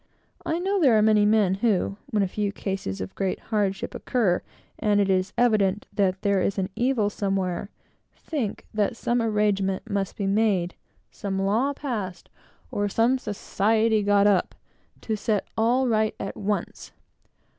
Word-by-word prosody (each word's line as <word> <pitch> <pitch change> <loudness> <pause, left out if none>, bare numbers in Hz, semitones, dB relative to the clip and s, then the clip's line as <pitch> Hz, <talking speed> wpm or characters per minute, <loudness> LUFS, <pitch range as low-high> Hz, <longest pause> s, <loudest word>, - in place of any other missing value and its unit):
I 320 - 0
know 385 +2 0
there 255 -8 +5
are - - +4
many 210 -1 +4
men 210 -3 +3
who, 200 -3 +1
when 210 -2 +1
a - - +1
few 205 +2 -2
cases 190 - -4
of 95 - -6
great 190 -1 -2
hardship 200 -2 0
occur, 215 -9 0 0.4
and 210 -2 +2
it 195 -1 +2
is 185 +1 +1
evident 210 -4 +2
that 190 -2 0
there 200 -2 +2
is 200 - 0
an 190 -1 -1
evil 240 -4 +1
somewhere, 195 -2 -2 0.5
think 265 -11 -4
that 215 +3 0
some 240 +1 0
arrangement 205 -3 0
must 200 -1 -2
be 200 - -3
made, 195 -3 +1 0.4
some 195 -2 -4
law 215 +8 +1
passed, 215 -11 -5 0.4
or 205 0 -1
some 235 +5 +2
society 215 +1 +1
got 205 0 +3
up, 200 -3 +2 0.5
to 220 - -2
set 210 -1 -1
all 245 +4 +2
right 220 -2 +1
at 195 - -5
once. 205 0 -3
205 Hz, 155 wpm, -25 LUFS, 195-220 Hz, 0.5 s, there